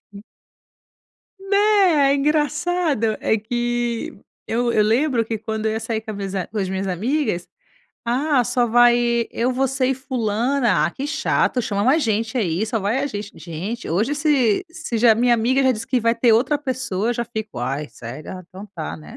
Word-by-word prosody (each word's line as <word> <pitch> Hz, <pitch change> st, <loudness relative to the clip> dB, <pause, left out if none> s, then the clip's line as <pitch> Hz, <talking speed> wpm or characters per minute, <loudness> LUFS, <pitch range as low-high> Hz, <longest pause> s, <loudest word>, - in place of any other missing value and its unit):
N 200 Hz, -, -9 dB, 1.2 s
Né? 390 Hz, -7 st, +3 dB
É -, -, +3 dB
engraçado. 295 Hz, -4 st, 0 dB
É 220 Hz, -, +1 dB
que 240 Hz, +1 st, -2 dB, 0.3 s
eu 240 Hz, +1 st, 0 dB
eu 215 Hz, -, +3 dB
lembro 235 Hz, +2 st, +2 dB
que 225 Hz, 0 st, -3 dB
quando 220 Hz, 0 st, -4 dB
eu 220 Hz, -, +2 dB
ia 220 Hz, -, -2 dB
sair 225 Hz, -1 st, -3 dB
com 220 Hz, 0 st, -7 dB
as 200 Hz, -, -7 dB
minhas 195 Hz, -1 st, -5 dB
a 185 Hz, -2 st, -2 dB
com 220 Hz, -, -7 dB
as 190 Hz, -2 st, -1 dB
minhas 190 Hz, +1 st, -2 dB
amigas: 200 Hz, -, -1 dB, 0.6 s
"Ah, 260 Hz, +2 st, +2 dB
só 245 Hz, +1 st, +1 dB
vai 240 Hz, 0 st, +4 dB
eu, 245 Hz, +2 st, 0 dB
você 265 Hz, 0 st, 0 dB
e 265 Hz, -, +2 dB
fulana? 240 Hz, -, 0 dB
Ah, 170 Hz, -, -2 dB
que 275 Hz, -, -5 dB
chato, 270 Hz, -4 st, +1 dB
chama 200 Hz, -2 st, -1 dB
mais 285 Hz, +6 st, +3 dB
gente 225 Hz, +3 st, -1 dB
aí, 185 Hz, -1 st, 0 dB
só 225 Hz, 0 st, -2 dB
vai 210 Hz, +7 st, 0 dB
a -, -, 0 dB
gente". 205 Hz, -5 st, -6 dB
Gente, 175 Hz, +9 st, -6 dB
hoje 215 Hz, -, 0 dB
se 290 Hz, -, +2 dB
se 325 Hz, -8 st, -4 dB
já 225 Hz, -1 st, +5 dB
minha 240 Hz, +2 st, +3 dB
amiga 245 Hz, +4 st, +2 dB
já 260 Hz, -, +4 dB
disse 230 Hz, +2 st, -5 dB
que 255 Hz, -1 st, +1 dB
vai 230 Hz, +1 st, +2 dB
ter 235 Hz, -1 st, +4 dB
outra 255 Hz, +6 st, +2 dB
pessoa, 255 Hz, -7 st, -2 dB
eu -, -, +1 dB
já 235 Hz, 0 st, -3 dB
fico: 220 Hz, -3 st, -6 dB
"Ai, 135 Hz, +5 st, -3 dB
sério? 120 Hz, +6 st, -9 dB
Ah, 185 Hz, -1 st, -8 dB
então 190 Hz, +2 st, -10 dB
tá, 75 Hz, +2 st, -4 dB
né?" 75 Hz, -1 st, -12 dB
235 Hz, 195 wpm, -21 LUFS, 210-265 Hz, 1.2 s, já